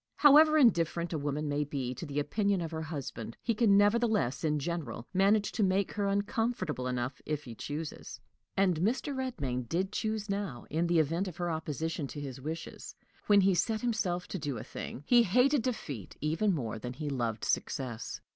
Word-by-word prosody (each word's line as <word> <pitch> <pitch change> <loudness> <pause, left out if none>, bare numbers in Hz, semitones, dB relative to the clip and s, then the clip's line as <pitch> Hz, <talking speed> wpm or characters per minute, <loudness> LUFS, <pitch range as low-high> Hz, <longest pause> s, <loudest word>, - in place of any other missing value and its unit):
However 305 +2 +7
indifferent 170 - +3
a - - 0
woman 145 +1 -2
may 145 +1 0
be 135 -3 -3
to 165 - -7
the 140 0 -5
opinion 200 +6 +1
of 165 -1 -4
her 160 -1 -3
husband, 140 -8 -6
he 230 - +1
can 210 -3 +4
nevertheless 205 - +2
in 150 -1 +2
general 140 -7 -4
manage 200 +2 +3
to 225 - -2
make 190 +1 +2
her 205 -1 -1
uncomfortable 200 - -1
enough 125 +1 -3
if 150 -1 -3
he 120 - -8
chooses; 150 +6 -6 0.4
and 190 -4 +3
Mr. 240 - 0
Redmain 140 - -3
did 190 +3 0
choose 215 -1 -2
now, 200 - -3
in 165 +3 +1
the 170 0 +2
event 165 +5 +1
of 175 -2 -7
her 175 -2 -1
opposition 160 -1 -3
to 145 - -7
his 135 -2 -6
wishes: 160 +4 -6 0.3
when 205 -1 +6
he 195 0 +4
set 215 +4 0
himself 200 -7 -1
to 190 - -3
do 145 -5 -3
a - - -6
thing, 135 - -7
he 240 +6 +6
hated 250 +6 +3
defeat 150 - -4
even 160 +8 +1
more 115 - -2
than 125 +3 -5
he 150 +3 -5
loved 120 -5 -2
success. 120 -4 -2
170 Hz, 190 wpm, -31 LUFS, 145-205 Hz, 0.4 s, However